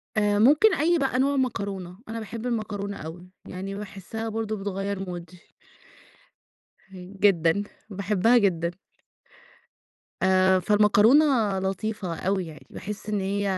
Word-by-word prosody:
آآ 205 -1 +2
ممكن 300 - +5
أي 340 +4 +2
بقى 265 -2 0
نوع 280 +2 +2
مكرونة، 200 -7 -3
أنا 230 +1 -4
باحب 225 +2 -7
المكرونة 210 -4 -3
أوي، 175 +3 -9 0.2
يعني 195 +2 -6
باحسّها 210 +2 -6
برضه 220 0 -3
بتغيّر 195 -1 -4
مودي. 175 0 -8 1.4
هين 185 0 -12
جدًا، 190 -1 +3 0.3
باحبها 205 +3 +2
جدًا. 170 -6 +1 1.5
آآ 190 0 +4
فالمكرونة 210 +8 +5 0.3
لطيفة 190 -1 -3
أوي 190 0 -1
يعني، 155 -1 -12
باحس 210 +2 -7
إن 210 - 0
هي 200 +1 -1
200 Hz, 120 wpm, -25 LUFS, 185-220 Hz, 1.5 s, ممكن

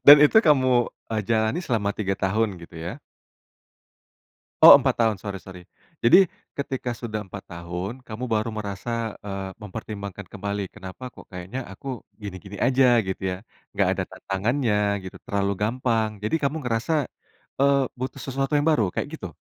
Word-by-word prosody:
Dan 145 - +13
itu 150 - +5
kamu, 130 - +4 0.2
eee, 110 -1 0
jalani 110 - +1
selama 110 -7 0
3 100 -1 -1
tahun 100 +2 0
gitu 85 0 -12
ya? 80 - -4 1.7
Oh - - +13
4 130 -2 +1
tahun 110 -2 +3
sorry 100 -1 -5
sorry. 95 -1 -10 0.4
Jadi 115 - +8 0.4
ketika 130 -3 -3
sudah 110 -3 -3
4 95 +1 -9
tahun, 85 +3 -5
kamu 110 +3 -5
baru 110 +1 +1
merasa, 110 +2 -3
eee, 95 -1 -5
mempertimbangkan 100 -1 -7
kembali 100 0 -3
kenapa 95 +4 -9
kok - - -14
kayaknya 90 +6 -6
aku 95 - -14 0.4
gini-gini 100 0 -7
aja 130 +1 +4 0.2
gitu 95 - -4
ya? 90 - -3 0.4
Nggak - - +3
ada - - -1
tantangannya 110 +5 -1 0.3
gitu 95 - -8
terlalu 100 0 0
gampang 115 0 +1 0.2
jadi 110 - 0
kamu 140 +3 0
ngerasa, 115 +5 -1 0.7
eee, 140 0 +5 0.2
butuh 130 - -4
sesuatu 135 +1 -2
yang 145 - +2
baru 120 -9 +3
kayak - - -2
gitu? 95 - -8
110 Hz, 155 wpm, -25 LUFS, 100-125 Hz, 1.7 s, Dan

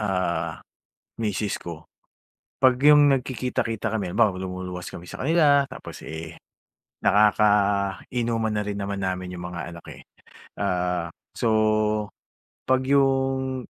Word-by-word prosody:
ah, 95 -4 -1 0.6
misis 105 -2 -1
ko,'pag 80 -2 -11 0.9
yung 145 -1 +7
nagkikita-kita 125 -4 -2
kami 100 -4 -1
halimbawa 110 -1 +3
lumuluwas 90 -1 -5
kami 85 - -9
sa - - -9
kanila 145 -2 +4
tapos, - - -10
eh, 80 0 -7 0.7
nakakainom 105 +2 +2
man 110 -2 0
rin 100 -1 -4
naman 100 0 -3
namin 90 -1 -3
yung 90 0 -7
mga 85 - -5
anak, 85 - -12
eh. - - -12 0.6
Ah, 90 -3 0 0.3
so, 110 -1 +1 0.6
'pag 130 0 +3
yung. 135 -1 +1
105 Hz, 115 wpm, -24 LUFS, 90-125 Hz, 0.9 s, yung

